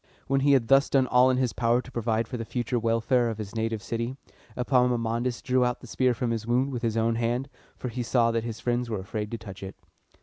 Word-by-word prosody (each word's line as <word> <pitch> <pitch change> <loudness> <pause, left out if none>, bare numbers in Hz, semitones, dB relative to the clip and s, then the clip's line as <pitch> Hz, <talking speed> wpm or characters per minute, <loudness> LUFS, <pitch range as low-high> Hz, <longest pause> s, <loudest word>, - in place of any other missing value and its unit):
When 135 0 +1
he 140 +1 +4
had 125 -4 +3
thus 135 +2 +5
done 135 -2 +3
all 125 +1 +4
in 130 - +2
his 130 -2 0
power 120 0 +2
to 130 - -9
provide 115 -1 -1
for 125 - -6
the 115 - -3
future 120 +1 -2
welfare 115 +2 +2
of 110 - -4
his 105 -2 -6
native 110 -1 -2
city, 115 +3 -3 0.4
Epaminondas 125 -1 +1
drew 125 0 +2
out 125 0 0
the - - -12
spear 125 +1 +1
from 120 0 -1
his 115 -1 -3
wound 125 +3 +1
with 125 -3 -4
his 115 -2 -1
own 115 0 +1
hand, 120 +4 -1 0.3
for 125 - -4
he 125 +1 -4
saw 115 0 +2
that 115 -1 -1
his 115 -1 -5
friends 120 0 -1
were 110 -3 -2
afraid 105 +2 -4
to 115 - -4
touch 100 -4 -10
it. 95 0 -7
120 Hz, 245 wpm, -27 LUFS, 115-125 Hz, 0.4 s, thus